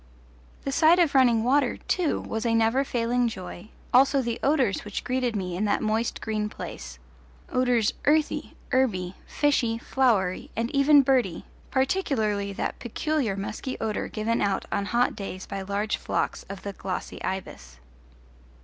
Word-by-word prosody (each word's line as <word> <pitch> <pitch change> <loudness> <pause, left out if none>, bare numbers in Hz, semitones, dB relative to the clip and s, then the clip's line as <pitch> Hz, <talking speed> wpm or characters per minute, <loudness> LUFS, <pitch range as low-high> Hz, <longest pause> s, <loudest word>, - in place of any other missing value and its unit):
The 275 - -2
sight 325 +4 +5
of 340 -5 +3
running 245 -4 +4
water, 275 +4 +2
too, 350 -5 0
was 220 0 -4
a 230 -1 +2
never 225 +4 +3
failing 245 -1 0
joy, 185 -2 -7 0.2
also 275 +2 +5
the 235 -3 -2
odours 270 -8 +2
which 205 -1 -5
greeted 250 -2 -1
me 180 -3 -3
in 200 +4 0
that 205 - +1
moist 220 +2 -1
green 215 -1 -2
place - - -8 0.5
odours 245 -4 +2
earthy, 305 +1 +1 0.2
herby, 200 -9 +1
fishy, 255 -6 +1
flowery, 230 -8 +1
and 230 +2 -1
even 280 0 +6
birdy, 250 -10 +1 0.2
particularly 250 - 0
that 195 - -3
peculiar 255 -2 -1
musky 210 +6 -4
odour 220 -1 -2
given 225 +2 -1
out 200 -1 0
on 200 - 0
hot 240 +4 +1
days 190 -2 -6
by 195 - -5
large 200 +2 -1
flocks - - -2
of 195 -1 -7
the 200 - -5
glossy 190 -1 -5
ibis. - - -5
230 Hz, 150 wpm, -26 LUFS, 200-265 Hz, 0.5 s, even